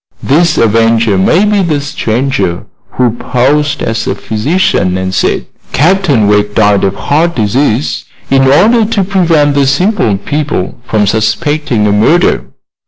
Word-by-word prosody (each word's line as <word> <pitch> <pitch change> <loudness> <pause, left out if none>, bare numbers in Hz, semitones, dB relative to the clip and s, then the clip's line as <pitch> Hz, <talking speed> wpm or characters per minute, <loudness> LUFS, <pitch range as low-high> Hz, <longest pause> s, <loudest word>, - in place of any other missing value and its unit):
This 160 +4 +1
avenger 115 -1 +2
may 160 - +2
be 205 -1 +1
the 160 -5 -1
stranger 130 -8 -2 0.3
who 125 -2 +1
posed 140 +5 -1
as 115 0 -3
a - - -1
physician 110 - -1
and 95 0 -3
said 95 - -1 0.3
Captain 155 - +2
Wegg 105 0 +1
died 105 -2 +2
of 100 0 0
heart 165 +8 -1
disease, 120 +4 -1 0.3
in 135 0 +3
order 215 - +4
to 210 -2 -1
prevent 170 -6 +1
the 140 -1 +1
simple 160 - +1
people 145 -1 -3
from 105 -2 +1
suspecting 120 - -1
a 105 - +1
murder. 115 - +2
135 Hz, 140 wpm, -10 LUFS, 110-160 Hz, 0.3 s, order